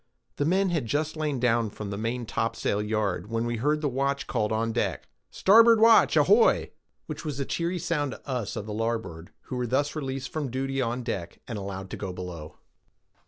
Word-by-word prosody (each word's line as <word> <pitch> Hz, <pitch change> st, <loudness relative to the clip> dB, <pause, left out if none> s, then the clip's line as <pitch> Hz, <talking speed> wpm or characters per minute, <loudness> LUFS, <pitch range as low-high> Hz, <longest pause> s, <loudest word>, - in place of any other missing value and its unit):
The 145 Hz, -, +1 dB
men 190 Hz, +4 st, +2 dB
had 155 Hz, -9 st, -1 dB
just 150 Hz, +6 st, -1 dB
lain 150 Hz, -4 st, -1 dB
in 115 Hz, -2 st, +2 dB
from 100 Hz, 0 st, -7 dB
the -, -, -3 dB
maintopsail 115 Hz, -1 st, -1 dB
yard, 105 Hz, -3 st, -1 dB
when 115 Hz, 0 st, -1 dB
we 120 Hz, 0 st, -2 dB
heard 150 Hz, +6 st, +1 dB
the 150 Hz, -, +1 dB
watch 140 Hz, +1 st, -1 dB
called 110 Hz, -4 st, -1 dB
on 115 Hz, +1 st, 0 dB
deck,—"Starboard 205 Hz, -, +3 dB
watch, 225 Hz, +1 st, +6 dB
ahoy!"—which 460 Hz, +3 st, +2 dB
was 150 Hz, -3 st, -4 dB
a 140 Hz, -, -1 dB
cheery 170 Hz, +5 st, -1 dB
sound 150 Hz, -5 st, -1 dB
to -, -, -13 dB
us 125 Hz, -6 st, -3 dB
of 100 Hz, -, -4 dB
the 105 Hz, -, -5 dB
larboard, 110 Hz, -7 st, -3 dB
who 130 Hz, -, -6 dB
were 125 Hz, -1 st, -1 dB
thus 140 Hz, +5 st, 0 dB
released 135 Hz, -3 st, -4 dB
from 150 Hz, -4 st, -3 dB
duty 135 Hz, +2 st, -2 dB
on 120 Hz, +1 st, -2 dB
deck 100 Hz, -8 st, -4 dB
and 115 Hz, -4 st, -4 dB
allowed 95 Hz, -1 st, -6 dB
to -, -, -5 dB
go 95 Hz, -3 st, -4 dB
below. 90 Hz, -4 st, -7 dB
120 Hz, 190 wpm, -27 LUFS, 105-145 Hz, -, watch